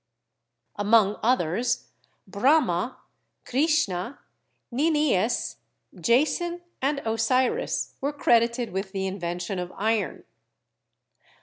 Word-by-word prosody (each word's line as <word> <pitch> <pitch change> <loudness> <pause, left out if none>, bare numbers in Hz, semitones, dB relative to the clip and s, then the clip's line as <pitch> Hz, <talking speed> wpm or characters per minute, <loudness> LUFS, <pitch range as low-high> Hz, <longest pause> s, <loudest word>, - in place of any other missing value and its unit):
Among 205 0 +3
others, 230 -1 0 0.4
Brahma, 210 - +2 0.5
Krishna, 265 - 0 0.5
Nin 305 +6 +2
Ies, 240 -6 +1 0.4
Jason 325 +8 +1 0.2
and 275 +1 0
Osiris 225 +3 0
were 280 +2 0
credited 235 -4 +2
with 190 +1 -4
the 190 -1 -2
invention 180 0 -3
of 180 0 -5
iron. 220 +1 -1
230 Hz, 85 wpm, -26 LUFS, 195-275 Hz, 0.5 s, Among